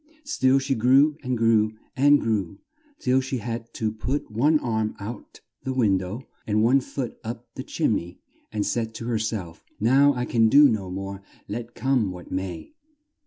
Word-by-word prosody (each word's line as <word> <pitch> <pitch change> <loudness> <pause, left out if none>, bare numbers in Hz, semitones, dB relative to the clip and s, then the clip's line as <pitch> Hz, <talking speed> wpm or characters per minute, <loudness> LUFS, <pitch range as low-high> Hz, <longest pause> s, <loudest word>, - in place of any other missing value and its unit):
Still 135 - +2
she 135 0 0
grew 135 +5 +4
and 130 -3 -2
grew 110 -1 +2 0.2
and 145 +1 +5
grew 100 -5 -1 0.4
till 130 +1 +2
she 130 0 -3
had 115 0 -5
to 110 -1 -1
put 115 +4 -3
one 145 +9 +3
arm 110 -5 -1
out 105 +4 -8 0.2
the 130 -1 -3
window 100 0 0 0.2
and 105 0 +2
one 130 +4 +4
foot 130 -1 -5
up 115 +1 -7
the 130 - -6
chim 140 -2 0
ney 85 +1 -8 0.3
and 105 -2 -1
said 110 -1 -2
to 115 - -6
her 115 -2 0
self, 105 -7 -4 0.2
"Now 135 +6 +4
I 125 0 -1
can 115 -2 +3
do 145 +4 +8
no 105 -7 -1
more, 95 +1 -5 0.3
let 115 +3 -6
come 125 -4 +1
what 90 -1 -9
may." 90 -4 -5
115 Hz, 175 wpm, -25 LUFS, 105-130 Hz, 0.4 s, do